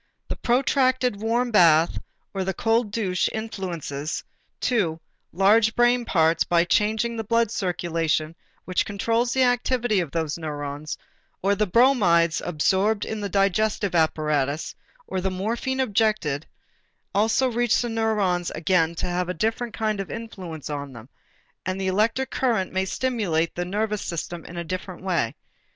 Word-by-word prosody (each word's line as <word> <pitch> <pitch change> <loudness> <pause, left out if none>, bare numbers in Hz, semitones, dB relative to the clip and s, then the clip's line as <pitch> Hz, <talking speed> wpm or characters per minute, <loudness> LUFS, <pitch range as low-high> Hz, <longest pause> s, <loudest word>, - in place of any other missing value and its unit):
The - - -2
protracted 255 -2 +1
warm 235 +2 0
bath 165 -5 +5 0.3
or 195 -1 -1
the 190 0 -2
cold 225 0 +1
douche 195 -4 0
influences, 170 -9 -4 0.4
too, 180 -10 0 0.3
large 210 +5 +4
brain 240 0 +3
parts 165 -4 +3
by 170 -1 +3
changing 220 +5 +1
the 225 - -3
blood 230 0 +1
circulation 165 -5 -1 0.3
which 185 - +1
controls 230 +4 0
the 260 +1 +3
activity 245 -3 +1
of 170 -4 -2
those 160 0 -2
neurons; 145 -1 -5 0.5
or 200 +1 +3
the 210 +1 +1
bromides 185 -8 +4
absorbed 190 +6 +1
in 220 -1 -4
the 200 - -3
digestive 200 +1 +1
apparatus, 155 -3 0 0.3
or 185 - -3
the 190 - 0
morphine 230 +8 -2
injected, 210 - +1 0.7
also 220 +6 +3
reach 240 0 +2
the 240 - -1
neurons 210 -6 0
and - - -7
again 170 -1 +2
have 180 0 -1
a 180 - -2
different 225 +5 -1
kind 215 -2 -1
of 195 - -4
influence 185 -9 -7
on 145 -2 -5
them, 115 +2 -12 0.5
and 185 +1 -3
the 190 - -2
electric 220 +7 +1
current 225 -9 0
may 190 0 +1
stimulate 190 -9 -1
the 175 - -3
nervous 210 +2 -1
system 170 0 -4
in - - -10
still 170 - -4
a - - -4
different 185 +1 -6
way. 170 -11 0
195 Hz, 150 wpm, -24 LUFS, 170-225 Hz, 0.7 s, bath